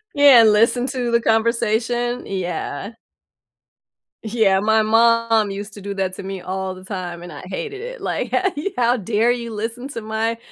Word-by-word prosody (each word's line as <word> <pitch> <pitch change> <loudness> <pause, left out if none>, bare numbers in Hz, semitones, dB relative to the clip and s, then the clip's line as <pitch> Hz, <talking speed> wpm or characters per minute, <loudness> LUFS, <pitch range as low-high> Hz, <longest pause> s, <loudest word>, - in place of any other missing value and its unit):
Yeah, 285 -4 +8
and 220 -1 +6
listen 235 +4 +3
to 250 -2 -2
the 235 0 +2
conversation, 230 +2 0
yeah. 180 +1 -4 1.3
Yeah, 210 -4 +2
my 220 +1 +3
mom 225 -1 +3
used 205 +1 -6
to 205 - -10
do 200 0 -5
that 190 -1 -2
to - - -7
me 195 -1 -6
all 190 0 -4
the 185 - -13
time, 180 -3 -6
and 175 - -9
I 145 - -9
hated 420 - -5
it. - - -7
Like, - - -2
how 380 0 +1
ye 310 +7 -3
how 245 0 +3
dare 225 +3 +1
you 235 -1 -4
listen 230 +4 -5
to 230 -5 -6
my 220 +1 -2
225 Hz, 185 wpm, -21 LUFS, 195-240 Hz, 1.3 s, Yeah